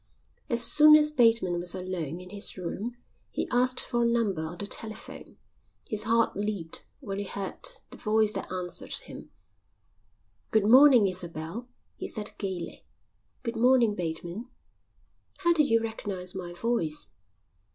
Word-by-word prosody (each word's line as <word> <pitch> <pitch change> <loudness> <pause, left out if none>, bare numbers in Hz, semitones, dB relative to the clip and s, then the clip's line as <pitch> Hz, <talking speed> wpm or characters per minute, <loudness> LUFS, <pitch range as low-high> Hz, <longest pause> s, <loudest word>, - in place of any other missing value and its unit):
As 235 -1 +3
soon 305 +5 +7
as 300 0 +4
Bateman 230 -10 +3
was 175 +1 -1
alone 180 -4 -4
in 180 0 -11
his 205 -1 -4
room 205 +7 -5 0.3
he - - -3
asked 250 +1 +2
for 240 -1 0
a 235 - +3
number 225 -8 +1
on 160 +2 -5
the 205 - -5
telephone. 215 +1 -4 0.5
His 215 0 0
heart 230 +1 +2
leaped 200 -5 -4
when 200 -6 -4
he 205 - -3
heard 195 0 -5 0.3
the - - -10
voice 215 -1 +2
that - - -4
answered 180 -1 -4
him. - - -7 1.2
"Good 220 -2 +3
morning, 255 0 +8
Isabel," 180 +4 -3 0.3
he - - -5
said 210 -2 -3
gaily. 190 -4 -5 0.6
"Good 230 -1 -3
morning, 240 -1 +4
Bateman." 175 +5 -4 0.9
"How 345 -2 +4
did 305 -4 +3
you 230 0 +4
recognise 195 -5 -4
my 180 -2 -6
voice?" 175 - -1
210 Hz, 145 wpm, -28 LUFS, 180-235 Hz, 1.2 s, morning